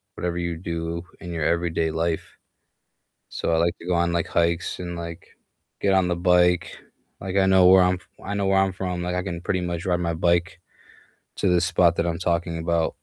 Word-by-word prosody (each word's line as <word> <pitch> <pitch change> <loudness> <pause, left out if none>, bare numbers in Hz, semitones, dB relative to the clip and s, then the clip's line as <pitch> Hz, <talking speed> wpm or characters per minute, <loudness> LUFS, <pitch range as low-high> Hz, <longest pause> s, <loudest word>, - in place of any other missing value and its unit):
whatever 85 0 -3
you 85 -1 -2
do 85 0 -4 0.2
in 85 -2 -7
your 80 -2 -2
everyday 85 -1 0
life. 80 0 -3 0.9
So - - -2
I - - +3
like 85 +1 +1
to - - -12
go 90 - +1
on, 85 0 +1
like, 85 0 0
hikes 85 0 0
and, 85 -1 -5
like, 85 0 -7 0.5
get 100 -1 +2
on 95 -2 +3
the 90 - +1
bike. 90 -1 +2 0.4
Like, 95 0 -3
I 95 - +4
know 95 -1 +5
where 95 0 +7
I'm 90 0 +3
f 90 - -14 0.2
I 100 - -4
know 100 -1 0
where 95 0 +3
I'm 95 -1 +1
from, 90 -1 -3
like, 90 +1 -2
I 90 - -1
can 90 -3 -4
pretty 90 0 -1
much 85 -1 -4
ride 90 -1 0
my 85 -1 -1
bike 85 +1 0 0.8
to - - +1
the 90 -1 +4
spot 85 -1 +3
that 85 - +1
I'm 85 -1 -2
talking 85 -1 -1
about. 80 0 0
85 Hz, 215 wpm, -24 LUFS, 85-90 Hz, 0.9 s, where